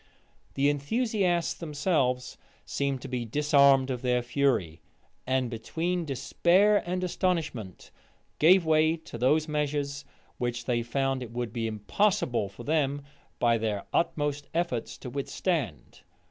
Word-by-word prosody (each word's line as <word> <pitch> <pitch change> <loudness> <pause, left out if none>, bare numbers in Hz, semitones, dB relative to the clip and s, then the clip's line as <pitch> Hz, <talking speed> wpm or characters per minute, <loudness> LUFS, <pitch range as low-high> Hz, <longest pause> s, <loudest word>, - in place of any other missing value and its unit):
The 140 +1 +2
enthusiasts 175 - 0
themselves 145 -5 -1 0.3
seemed 140 -2 -2
to - - -5
be 125 -1 -3
disarmed 140 +1 +4
of 125 -2 -3
their 125 -1 +1
fury; 120 - 0 0.5
and, 130 -1 +1
between 165 +10 -2
despair 180 +9 +3
and 180 +1 -2
astonishment, 160 - -2 0.5
gave 175 +3 +6
way 160 +1 +3
to 155 -7 -10
those 150 +6 +3
measures 145 -1 -2 0.4
which 120 0 -2
they 120 -2 +1
found 135 +2 -1
it 125 - -6
would 120 -1 -4
be 115 -2 -2
impossible 115 - 0
for 95 - -11
them, 145 -2 0 0.3
by 115 -1 +2
their 105 -2 -2
utmost 145 -3 -1
efforts, 165 -9 -2
to 125 - -8
withstand. 140 - -3
140 Hz, 130 wpm, -28 LUFS, 120-160 Hz, 0.5 s, gave